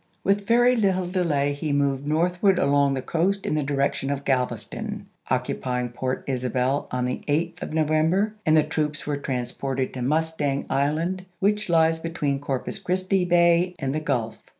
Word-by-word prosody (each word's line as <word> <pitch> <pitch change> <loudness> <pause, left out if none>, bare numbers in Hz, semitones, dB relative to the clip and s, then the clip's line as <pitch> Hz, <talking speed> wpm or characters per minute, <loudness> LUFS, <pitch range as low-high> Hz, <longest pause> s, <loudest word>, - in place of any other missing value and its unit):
With 200 +1 +1
very 245 +2 +5
little 190 -5 +1
delay 155 -6 0
he 145 +1 -3
moved 140 -1 0
northward 180 +5 +2
along 140 -3 +3
the 130 - -3
coast 195 +4 0
in - - 0
the 155 - +1
direction 140 -1 -1
of 140 0 -3
Galveston, 125 -3 -2 0.2
occupying 125 -1 -1
Point 130 +2 -3
Isabel 130 +1 -1
on 125 0 -1
the 125 - -3
8th 165 +4 -1
of - - -5
November 160 +7 +2
and 155 0 +4
the 155 - +5
troops 150 -1 -2
were 145 -1 -1
transported 130 0 -3
to 130 - -5
Mustang 150 0 0
Island 160 +7 0
which 210 +1 0
lies 165 -1 +3
between 150 -4 -2
Corpus 135 -2 -3
Christi 185 +1 0
Bay 175 0 +3
and 135 -4 -2
the 155 - 0
Gulf. 125 -7 -2
150 Hz, 165 wpm, -24 LUFS, 135-175 Hz, 0.2 s, very